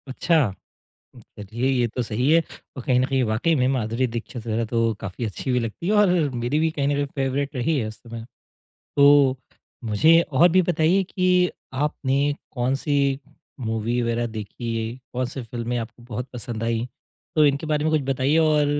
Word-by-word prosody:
अच्छा, 150 +1 +2 0.7
उ - - -12 0.2
चलिए 115 +6 -3
ये 125 -2 +2
तो 125 +3 -3
सही 120 +5 0
है 165 0 +5 0.3
और 130 - -5
कहीं 125 -1 +3
न - - +2
कहीं 135 -1 +1
वाक़ई 115 +9 +1
में 125 -2 +2
माधुरी 125 -1 0
दीक्षित 115 0 -6
वगैरह 115 +1 0
तो 115 0 +1
काफ़ी 100 +3 -5
अच्छी 110 +5 -3
भी 125 - +2
लगती 115 +8 -5
है 205 - +2
और 210 -2 +5 0.3
मेरी 120 +5 -1
भी 160 0 +2
कहीं 140 -3 -1
न 145 - +1
कहीं 145 0 0
फेवरेट 135 +1 -1
रही 140 +5 +1
है 115 - -1
उस 110 - -9
समय। 115 -1 -8 0.7
तो 140 -2 +6 0.5
मुझे 155 +10 +5
और 165 +7 +6
भी 185 +1 +5
बताइए 175 +2 +2
कि 180 -1 +2 0.2
आपने 140 0 0 0.2
कौन-सी 135 +2 0 0.4
मूवी 115 +1 -1
वगैरह 115 0 0
देखी 115 +1 -5
है? 120 - -8 0.2
कौन-सी 125 +1 -3
फिल्में 120 +1 -4
आपको 120 +1 -7
बहुत 120 +1 -6
पसंद 120 -2 -6
आई? 115 0 -1 0.5
तो 155 - +6
इनके 140 +2 0
बारे 150 -1 0
में 155 - +1
कुछ 155 - +3
बताइए 135 +4 +2
और 155 -2 +3
130 Hz, 185 wpm, -23 LUFS, 115-145 Hz, 0.7 s, तो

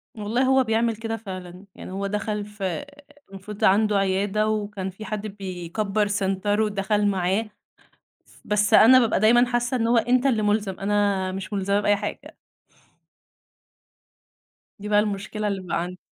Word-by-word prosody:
والله 220 +4 -1
هو 265 0 +4
بيعمل 225 0 0
كده 225 +1 -4
فعلًا. 185 -3 -9
يعني - - -9
هو 195 +1 -3
دخل 210 0 -3
في 210 -1 -10
آآ، 190 +10 -2 0.5
المفروض 195 +2 -8
عنده 210 +1 +4
عيادة 195 +2 0
وكان 210 -3 -3
في 195 +4 -10
حد 215 0 -4
بيكبّر 195 +1 -3
سنتر 205 +1 0
ودخل 210 0 0
معاه. 195 +3 0 0.8
ف - - -22
بس 210 0 +1
أنا 255 +4 +8
بابقى 230 -3 +1
دايمًا 235 +4 +5
حاسّة 245 +1 -1
إن 230 -1 0
هو 235 +1 +3
أنت 245 +3 +2
اللي 240 -6 +2
ملزم، 205 -2 0
أنا 200 -2 0
مش 190 +2 -6
ملزمة 200 0 0
بأي 205 0 +2
حاجة. 205 +1 -6 2.5
دي 205 +1 -6
بقى 205 0 +4
المشكلة 210 +1 -2
اللي 200 -2 -2
بقى 175 -2 -2
عندي. 180 +1 -6
205 Hz, 155 wpm, -24 LUFS, 195-220 Hz, 2.5 s, أنا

